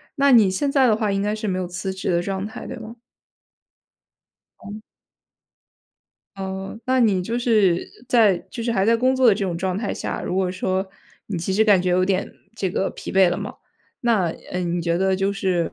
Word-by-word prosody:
那 280 -1 +4
你 220 -6 +6
现 275 +10 -1
在 270 -3 +4
的 215 - +4
话 215 -2 -1
应 195 0 0
该 210 +1 -1
是 215 0 -4
没 185 -2 -1
有 180 - -3
辞 190 +2 -4
职 190 - -4
的 170 0 +2
状 195 +1 -3
态， 220 - -8
对 - - -6
吗？ 225 +1 -9 1.7
哦。 210 +1 -8 1.6
哦， 190 +2 -5
那 260 0 +2
你 200 -6 +3
就 230 +6 -2
是 210 -8 +2 0.2
在 220 -7 +4
就 230 - -5
是 235 - -1
还 195 -3 +1
在 230 0 +4
工 255 +2 +2
作 260 -1 +4
的 220 - +6
这 200 - -2
种 175 -3 -2
状 185 +1 -2
态 210 0 -2
下， - - -4
如 180 - -3
果 185 -1 +1
说 185 +1 -2 0.4
你 200 - -4
其 180 +3 -2
实 220 +3 +3
感 200 -4 +5
觉 180 - 0
有 185 +1 +3
点 190 0 -1 0.2
这 195 -5 -2
个 190 - -1
疲 - - -8
惫 190 -1 +5
了 175 - -1
嘛， - - -6 0.5
那， 225 -7 +2 0.3
呃， 180 - -1
你 175 -1 -1
觉 170 0 0
得 190 +1 +1
就 195 +1 0
是， 185 -4 -1
195 Hz, 230 characters per minute, -22 LUFS, 185-220 Hz, 1.7 s, 你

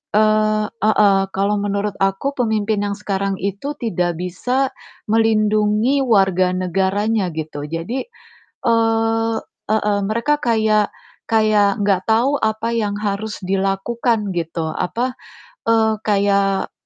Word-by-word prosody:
eee, 215 0 +3
heeh, 210 -3 +3 0.2
kalau 200 +2 +1
menurut 205 0 -1
aku 195 +8 +1
pemimpin 220 -3 0
yang 200 0 -2
sekarang 195 0 -2
itu 200 +10 -4
tidak 180 -7 -1
bisa 250 +9 -1 0.4
melindungi 215 +3 +2
warga 190 -6 +2
negaranya 190 +3 0
gitu. 155 -2 -5
Jadi 170 - -4 0.6
eee, 225 0 +2 0.4
heeh, 210 -1 +1
mereka 235 +8 +1
kayak 220 -3 +2 0.4
kayak 215 -2 +3
gak 190 -2 +2
tau 245 +6 +3
apa 220 +1 -1
yang 205 -3 -1
harus 210 +1 -3
dilakukan 195 +3 0
gitu 165 -1 -2
apa, 240 +11 -2 0.5
eee, 220 -1 +3
kayak 200 -1 +1
210 Hz, 110 wpm, -19 LUFS, 195-225 Hz, 0.6 s, eee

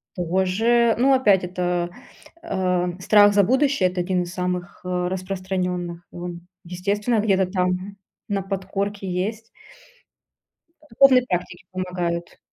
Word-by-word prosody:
Тоже, 190 +7 +2
ну, 270 +3 +4
опять, 210 -8 +4
это, 180 -1 -1 0.5
э, 180 -2 0
страх 205 +1 +5
за 200 0 +5
будущее, 260 -2 +2
это 180 0 -2
1 180 0 0
из 175 - -8
самых, 180 -1 -4
э, 180 -1 -1
распространённых. 180 -2 -3
И - - -16
он, 175 0 -6 0.2
естественно, 205 +6 -1
где-то 195 -3 +2
там 185 +1 -1 0.3
на 200 -3 -1
подкорке 195 +1 -4
есть. 215 +5 -3 1.4
Духовные 255 +1 +5
практики 180 0 -3
помогают. 180 -2 -3
185 Hz, 120 wpm, -23 LUFS, 180-205 Hz, 1.4 s, страх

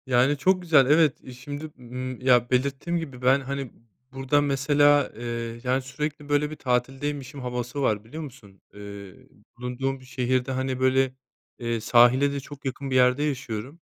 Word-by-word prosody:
Yani 130 +3 +3
çok 185 +5 +2
güzel 155 -6 +5
evet, 150 -3 +2
şimdi, 145 +5 -7
ımm, 125 +1 -6
ya 125 -2 +4
belirttiğim 140 +6 0
gibi 135 -6 -8
ben 130 +2 +4
hani 135 -1 -5 0.4
burada 135 +2 +1
mesela, 145 +1 +3
eee, 115 0 -4
yani 130 +1 +1
sürekli 145 +2 -5
böyle 145 0 +2
bir - - -5
tatildeymişim 135 +2 -2
havası 125 +2 -4
var 105 -5 +1
biliyor 155 +9 -8
musun? 110 -9 -13
Eee, 100 -2 -9 0.4
bulunduğum 130 +2 -3
şehirde 130 0 -1
hani 130 0 -2
böyle, 130 0 +2 0.5
eee, 115 -1 -2
sahile 120 +5 +5
de 140 - -3
çok 140 +1 -12
yakın 135 +1 -4
bir - - 0
yerde 125 +2 +4
yaşıyorum. 135 0 -4
130 Hz, 155 wpm, -25 LUFS, 125-145 Hz, 0.5 s, güzel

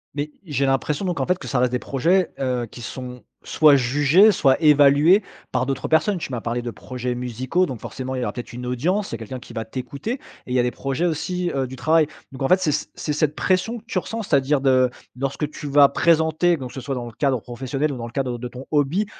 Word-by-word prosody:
Mais 150 +1 -3
j'ai 140 -4 0
l'impression 135 +4 0
donc 175 -2 -2
en - - 0
fait, 180 0 +2
que - - -9
ça 130 - 0
reste 125 0 +2
des 125 - +1
projets, 175 +7 +1
heu, 125 -3 -1
qui 120 - -10
sont 125 +1 -7 0.2
soit 150 -2 +5
jugés, 145 - +5
soit 135 -7 +3
évalués 150 +4 +6 0.3
par 130 0 0
d'autres 135 - -2
personnes. 160 +5 +2
Tu 145 - -6
m'as 120 -3 -3
parlé 120 +1 -2
de 120 - -4
projets 125 +1 -5
musicaux 125 +8 -1
donc 125 -5 -6
forcément 130 0 -5
il 130 - -2
y - - -1
aura - - -2
peut-être 120 -1 -7
une 125 +1 -6
audience, 170 - -1
il - - -2
y - - -5
a - - -20
quelqu'un 120 +3 -7
qui 125 - -13
va 115 - -4
t'écouter 130 - -5
et 270 - -4 0.3
il 125 - -3
y - - +4
a - - +3
des 125 - 0
projets 135 +7 -2
aussi, 175 +2 -1
heu, 135 -2 -1
du 130 - -8
travail, 155 +4 +3 0.2
donc 130 - -10
en 135 - +2
fait, 185 +4 +5
c'est 165 -5 +1 0.2
c'est 150 - -3
cette 150 0 0
pression 195 +5 0
que - - -24
tu 185 - -1
ressens, 225 +4 -5
c'est-à-dire 140 -3 +2
de 130 -2 +4 0.3
lorsque 135 +2 -2
tu 150 - -7
vas 140 0 +6
présenter 165 +1 +2
donc 130 -3 -6
que - - -14
ce 130 - -5
soit 135 +1 -3
dans 120 -1 -4
le 120 - -8
cadre 135 +1 0
professionnel 135 +4 -3
ou 130 - -5
dans 115 -1 -5
le 115 - -11
cadre 125 -2 -2
de 125 - -5
ton 125 +2 -10
hobby, 155 +8 +2
135 Hz, 260 wpm, -22 LUFS, 125-160 Hz, 0.3 s, évalués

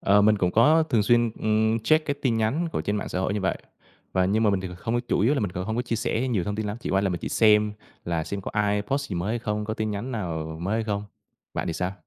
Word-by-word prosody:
Ờ, 100 +1 +4
mình 105 0 +4
cũng 90 -1 +2
có 150 - +5
thường 120 -9 +1
xuyên, 120 +2 +3
ừm, 110 +1 +2
check 155 +8 +2
cái 145 - 0
tin 130 -5 0
nhắn 130 +10 0
của - - -1
trên 105 +1 -1
mạng - - -3
xã - - -3
hội 95 +2 0
như 105 - -1
vậy, 95 - 0 0.5
và 95 0 +2
nhưng 105 +4 +2
mà 105 - +4
mình 100 -2 0
thì 95 - -5
không 120 +5 -1
chủ 120 - -1
yếu 120 +9 +3
là 140 - 0
mình 100 -5 -2
còn 90 +1 -3
hông 110 +2 -3
có 120 - +1
chia 120 -2 -2
sẻ 120 +3 -1
nhiều 100 -8 0
thông 105 +2 -3
tin 110 - -2
lắm, 105 +1 -3
chỉ - - -4
qua 95 - +3
là 100 - +1
mình 90 -2 -3
chỉ - - -4
xem 105 -1 +4 0.3
là 85 -2 -1
xem 100 - -4
có - - -6
ai 105 -1 +1
post 140 +6 -2
gì - - -2
mới 85 +5 -2
hay 120 - -1
không, 105 -2 -2
có 110 +1 -3
tin 110 -1 -2
nhắn 105 +6 -4
nào 80 -7 -4
mới 100 +5 -1
hay 115 - 0
không, 105 -1 -2 0.5
bạn - - -2
thì - - -1
sao? 90 +3 -2
105 Hz, 310 wpm, -25 LUFS, 100-115 Hz, 0.5 s, có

